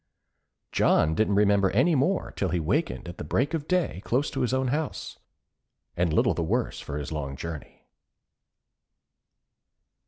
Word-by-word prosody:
John 80 Hz, 0 st, +3 dB
didn't 100 Hz, +3 st, +1 dB
remember 100 Hz, -1 st, +4 dB
any 130 Hz, -, +3 dB
more 160 Hz, +7 st, +1 dB
till 95 Hz, -, -2 dB
he 90 Hz, +1 st, 0 dB
wakened 105 Hz, -, -1 dB
at 85 Hz, -, -8 dB
the -, -, -4 dB
break 125 Hz, -, 0 dB
of 155 Hz, -2 st, -2 dB
day 180 Hz, -, 0 dB
close 130 Hz, +6 st, 0 dB
to 135 Hz, -, -2 dB
his 125 Hz, -, +1 dB
own 130 Hz, 0 st, +1 dB
house, 150 Hz, +2 st, -3 dB, 0.8 s
and 85 Hz, -1 st, +1 dB
little -, -, +3 dB
the -, -, -3 dB
worse 115 Hz, +9 st, -1 dB
for 75 Hz, -, -5 dB
his 75 Hz, 0 st, -5 dB
long 70 Hz, -3 st, -4 dB
journey. 80 Hz, -3 st, -8 dB
105 Hz, 155 wpm, -27 LUFS, 85-140 Hz, 0.8 s, remember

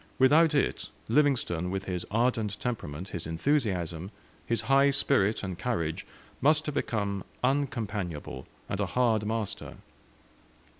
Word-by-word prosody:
Without 150 Hz, +4 st, +5 dB
it, 140 Hz, -, 0 dB, 0.2 s
Livingstone, 115 Hz, -, +2 dB
with 95 Hz, +1 st, -3 dB
his 90 Hz, -2 st, -3 dB
ardent 110 Hz, -2 st, 0 dB
temperament, 95 Hz, -8 st, -4 dB
his 85 Hz, -2 st, -5 dB
enthusiasm, 90 Hz, -, 0 dB, 0.4 s
his 115 Hz, -, +1 dB
high 135 Hz, +1 st, +4 dB
spirit 135 Hz, -7 st, +2 dB
and 95 Hz, -2 st, -4 dB
courage, 85 Hz, -10 st, -2 dB, 0.3 s
must 155 Hz, +2 st, +4 dB
have 150 Hz, -, -2 dB
become 100 Hz, -7 st, -1 dB, 0.2 s
uncompanionable, 105 Hz, -, -2 dB, 0.2 s
and 100 Hz, -, -3 dB
a 100 Hz, -, +1 dB
hard 110 Hz, -2 st, +2 dB
master. 110 Hz, -2 st, -3 dB
110 Hz, 120 wpm, -29 LUFS, 90-130 Hz, 0.4 s, Without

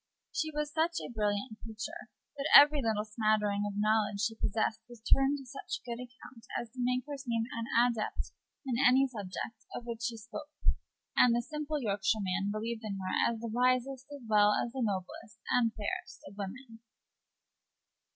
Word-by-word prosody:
She 315 Hz, -, 0 dB
was 300 Hz, -1 st, -3 dB
such 330 Hz, +1 st, +1 dB
a -, -, -6 dB
brilliant 210 Hz, +1 st, -1 dB
creature 230 Hz, +10 st, -7 dB, 0.3 s
that 285 Hz, +2 st, -2 dB
every 290 Hz, +1 st, +9 dB
little 220 Hz, -3 st, 0 dB
smattering 215 Hz, -2 st, +1 dB
of 205 Hz, 0 st, -5 dB
knowledge 210 Hz, -1 st, +2 dB
she 225 Hz, +1 st, +1 dB
possessed 220 Hz, 0 st, -1 dB
appeared 270 Hz, +4 st, +2 dB
to 270 Hz, -, -10 dB
such 270 Hz, +2 st, -5 dB
good 235 Hz, 0 st, -4 dB
account 245 Hz, -1 st, -12 dB
as 235 Hz, -2 st, -7 dB
to 255 Hz, -, -6 dB
make 250 Hz, +1 st, +1 dB
her 290 Hz, -1 st, -5 dB
seem 235 Hz, -4 st, -1 dB
an 230 Hz, 0 st, -3 dB, 0.2 s
adept 230 Hz, -3 st, -2 dB, 0.3 s
in 255 Hz, 0 st, +1 dB
any 265 Hz, +1 st, +6 dB
subject 210 Hz, -1 st, -6 dB
of 240 Hz, -, -6 dB
which 235 Hz, -1 st, -5 dB
she 235 Hz, -1 st, -2 dB
spoke, 240 Hz, +7 st, -8 dB, 0.7 s
and 240 Hz, -2 st, +6 dB
the 240 Hz, -, +2 dB
simple 300 Hz, +1 st, -3 dB
Yorkshireman 200 Hz, -3 st, 0 dB
believed 225 Hz, +2 st, -3 dB
in 205 Hz, -2 st, -3 dB
her 185 Hz, -1 st, -3 dB, 0.2 s
as 225 Hz, -1 st, -6 dB
the 235 Hz, -, -3 dB
wisest, 255 Hz, +2 st, +1 dB
as 285 Hz, -3 st, -9 dB
well 210 Hz, -1 st, +5 dB
as 235 Hz, -, -1 dB
the 265 Hz, +1 st, -4 dB
noblest 205 Hz, 0 st, -3 dB
and 235 Hz, -2 st, +3 dB
fairest 205 Hz, -, -4 dB
of 195 Hz, -, -11 dB
women. 225 Hz, +4 st, -7 dB
230 Hz, 170 wpm, -32 LUFS, 215-260 Hz, 0.7 s, every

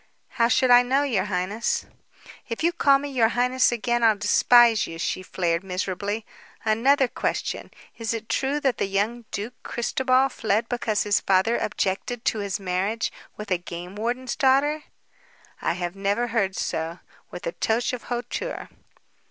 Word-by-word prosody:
"How 230 Hz, -, +2 dB
should 255 Hz, +1 st, +3 dB
I 245 Hz, 0 st, +9 dB
know, 265 Hz, +3 st, +1 dB
your 225 Hz, -9 st, 0 dB
highness?" 200 Hz, +3 st, -1 dB, 0.6 s
"If 230 Hz, +6 st, -4 dB
you 340 Hz, +1 st, +3 dB
call 275 Hz, -4 st, +4 dB
me 285 Hz, +1 st, -5 dB
'your 245 Hz, -5 st, +3 dB
highness' 250 Hz, +2 st, +2 dB
again 240 Hz, 0 st, 0 dB
I'll 220 Hz, -2 st, +5 dB
despise 230 Hz, +2 st, +5 dB
you," 165 Hz, -, -7 dB
she 185 Hz, -, -2 dB
flared 175 Hz, -2 st, -1 dB
miserably. 195 Hz, +3 st, -3 dB, 0.4 s
"Another 255 Hz, +5 st, +3 dB
question. -, -, -3 dB, 0.3 s
Is 225 Hz, -1 st, -2 dB
it 225 Hz, -1 st, -4 dB
true 275 Hz, +4 st, 0 dB
that 265 Hz, -3 st, 0 dB
the -, -, +1 dB
young 215 Hz, +5 st, -1 dB
Duke 215 Hz, +5 st, -5 dB
Christobal 255 Hz, +2 st, +1 dB
fled 225 Hz, -2 st, 0 dB
because 230 Hz, -4 st, 0 dB
his 205 Hz, -1 st, +2 dB
father 195 Hz, +5 st, +2 dB
objected 215 Hz, +4 st, -2 dB
to 220 Hz, -, +1 dB
his 200 Hz, 0 st, -2 dB
marriage 195 Hz, +4 st, -1 dB, 0.3 s
with 210 Hz, -2 st, -8 dB
a 180 Hz, -, +2 dB
game 175 Hz, +2 st, -8 dB
warden's 240 Hz, +4 st, -2 dB
daughter?" 290 Hz, +2 st, +2 dB, 0.8 s
"I -, -, +1 dB
have 175 Hz, +1 st, -4 dB
never 200 Hz, +5 st, 0 dB
heard 200 Hz, -4 st, 0 dB
so," 165 Hz, 0 st, -3 dB, 0.3 s
with -, -, -8 dB
a -, -, -1 dB
touch 230 Hz, -, 0 dB
of 250 Hz, -, -6 dB
hauteur. 245 Hz, -, -4 dB
225 Hz, 160 wpm, -25 LUFS, 195-250 Hz, 0.8 s, I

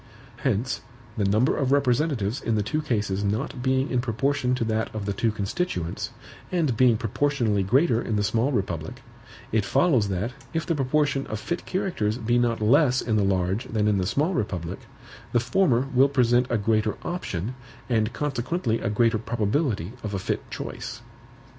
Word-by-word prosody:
Hence, 125 Hz, -1 st, -1 dB, 0.3 s
the 105 Hz, -, 0 dB
number 110 Hz, +7 st, +3 dB
of 135 Hz, -2 st, 0 dB
representatives 135 Hz, -3 st, +1 dB
in 115 Hz, -, 0 dB
the 105 Hz, -, +1 dB
two 155 Hz, +9 st, -1 dB
cases 105 Hz, -8 st, -1 dB
not 110 Hz, +5 st, -2 dB
being 130 Hz, +1 st, +1 dB
in 125 Hz, -, +2 dB
proportion 130 Hz, +2 st, 0 dB
to 125 Hz, -, -1 dB
that 110 Hz, 0 st, 0 dB
of 105 Hz, -2 st, -3 dB
the 100 Hz, -, -1 dB
two 115 Hz, +3 st, +1 dB
constituents, 100 Hz, -, -2 dB, 0.4 s
and 160 Hz, -9 st, +1 dB
being 120 Hz, -1 st, +4 dB
proportionally 115 Hz, -2 st, 0 dB
greater 120 Hz, -, +3 dB
in 110 Hz, -, -2 dB
the 105 Hz, -, +1 dB
small 115 Hz, +6 st, +1 dB
republic, 85 Hz, -, -3 dB, 0.5 s
it 110 Hz, -2 st, +2 dB
follows 130 Hz, -, +3 dB
that, 100 Hz, +5 st, -1 dB, 0.2 s
if 160 Hz, -, 0 dB
the 170 Hz, -, 0 dB
proportion 145 Hz, 0 st, +1 dB
of 110 Hz, -, -4 dB
fit 170 Hz, +9 st, -4 dB
characters 175 Hz, -, -1 dB
be 120 Hz, 0 st, +1 dB
not 120 Hz, -2 st, +1 dB
less 130 Hz, +3 st, +4 dB
in 110 Hz, -, 0 dB
the 105 Hz, -, +3 dB
large 95 Hz, +2 st, 0 dB
than 105 Hz, -2 st, 0 dB
in 105 Hz, -2 st, +2 dB
the 90 Hz, -, 0 dB
small 150 Hz, -, +1 dB
republic, 90 Hz, -, -3 dB, 0.5 s
the 120 Hz, -, +4 dB
former 130 Hz, -2 st, +2 dB
will 135 Hz, +2 st, +5 dB
present 125 Hz, -2 st, +3 dB
a 120 Hz, -, +2 dB
greater 110 Hz, 0 st, +1 dB
option, 120 Hz, -, -3 dB, 0.3 s
and 110 Hz, -2 st, +1 dB
consequently 130 Hz, -2 st, -1 dB
a -, -, -1 dB
greater 115 Hz, +1 st, +2 dB
probability 115 Hz, -, -1 dB
of 105 Hz, -2 st, -4 dB
a -, -, 0 dB
fit 95 Hz, -, -3 dB
choice. -, -, -6 dB
115 Hz, 175 wpm, -25 LUFS, 105-135 Hz, 0.5 s, will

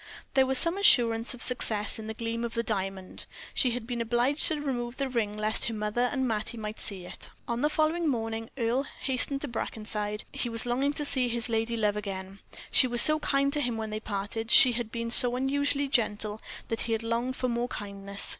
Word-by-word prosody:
There 265 Hz, -1 st, +4 dB
was 265 Hz, 0 st, +5 dB
some 335 Hz, +7 st, +4 dB
assurance 235 Hz, -, +4 dB
of 245 Hz, -, -2 dB
success 220 Hz, -4 st, +1 dB
in 220 Hz, -, -7 dB
the 220 Hz, -, -5 dB
gleam 230 Hz, +1 st, -3 dB
of 235 Hz, -1 st, -4 dB
the 230 Hz, -, 0 dB
diamond. 195 Hz, -3 st, -4 dB, 0.3 s
She 255 Hz, -, +3 dB
had 240 Hz, -1 st, -3 dB
been 240 Hz, 0 st, -3 dB
obliged 240 Hz, +5 st, +2 dB
to 310 Hz, -, 0 dB
remove 245 Hz, -4 st, -4 dB
the 275 Hz, -, -1 dB
ring 220 Hz, -5 st, -2 dB
lest 215 Hz, +4 st, 0 dB
her 230 Hz, -3 st, -2 dB
mother 215 Hz, +4 st, -1 dB
and 265 Hz, -2 st, -1 dB
Mattie 220 Hz, +1 st, -3 dB
might 215 Hz, 0 st, -6 dB
see 190 Hz, -4 st, -4 dB
it. -, -, -8 dB, 0.2 s
On 235 Hz, 0 st, -2 dB
the 300 Hz, -, +2 dB
morning 320 Hz, +1 st, +1 dB
following 225 Hz, -1 st, -4 dB
Earle 245 Hz, +3 st, 0 dB
hastened 275 Hz, +1 st, +1 dB
to 295 Hz, -, -4 dB
Brackenside. 210 Hz, -2 st, -4 dB
He 240 Hz, -, -3 dB
was 230 Hz, +1 st, -2 dB
longing 265 Hz, +4 st, 0 dB
to 295 Hz, 0 st, -4 dB
see 260 Hz, -3 st, +1 dB
his 235 Hz, +1 st, 0 dB
lady 225 Hz, +1 st, -1 dB
love 210 Hz, -2 st, +1 dB
again; 195 Hz, -1 st, -6 dB, 0.3 s
she 255 Hz, -, +5 dB
was 240 Hz, -1 st, +7 dB
so 310 Hz, 0 st, +5 dB
kind 275 Hz, -1 st, +1 dB
to 295 Hz, -, +1 dB
him 245 Hz, -4 st, -1 dB
when 220 Hz, -1 st, -4 dB
they 215 Hz, -, -3 dB
parted 215 Hz, +2 st, -4 dB
she 255 Hz, -, +8 dB
had 235 Hz, -2 st, -3 dB
been 230 Hz, 0 st, -4 dB
so 245 Hz, 0 st, +5 dB
unusually 285 Hz, +2 st, 0 dB
gentle 215 Hz, -4 st, -1 dB, 0.3 s
that 225 Hz, -, -2 dB
he 230 Hz, -, -1 dB
had 225 Hz, 0 st, -2 dB
longed 235 Hz, +3 st, -2 dB
for 255 Hz, -, -2 dB
more 240 Hz, 0 st, -1 dB
kindness. 200 Hz, -3 st, -4 dB
235 Hz, 220 wpm, -28 LUFS, 215-260 Hz, 0.3 s, she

